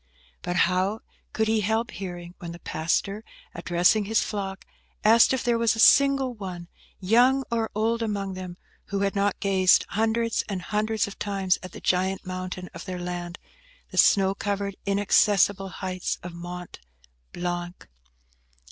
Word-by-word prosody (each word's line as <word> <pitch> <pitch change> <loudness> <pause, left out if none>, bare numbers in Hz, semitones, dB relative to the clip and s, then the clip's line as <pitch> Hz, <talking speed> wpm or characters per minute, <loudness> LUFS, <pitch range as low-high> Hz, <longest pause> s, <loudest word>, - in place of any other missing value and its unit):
But 175 - -3
how 185 +5 0 0.3
could 220 0 0
he 220 0 +2
help 220 +3 0
hearing, 175 -2 -7
when 170 -1 -7
the 170 - -10
pastor, 195 +6 -1 0.3
addressing 180 +5 +2
his 220 +2 +2
flock, 195 -2 -4 0.4
asked 225 +2 +6
if 265 - 0
there 235 -1 +1
was 230 -1 +2
a - - -6
single 275 +1 +5
one, 180 -5 -8 0.3
young 245 +7 +4
or 230 -1 0
old, 225 +2 0
among 200 -3 -2
them, 185 -1 -7 0.3
who 200 0 -3
had 200 0 0
not 200 0 0
gazed 190 -2 +4
hundreds 225 +2 0
and 190 -3 -4
hundreds 215 +1 0
of 200 - -10
times 195 -2 0
at 185 - -9
the - - -10
giant 190 +2 0
mountain 185 0 -5
of 165 - -9
their 185 -1 -5
land–the 180 - -9
snow 195 -1 +5
covered, 200 -1 -3
inaccessible 200 -1 +3
heights 185 -1 -4
of 180 -1 -7
Mont 175 +1 -8 0.5
Blanc? 175 0 -5
195 Hz, 150 wpm, -25 LUFS, 180-220 Hz, 0.5 s, asked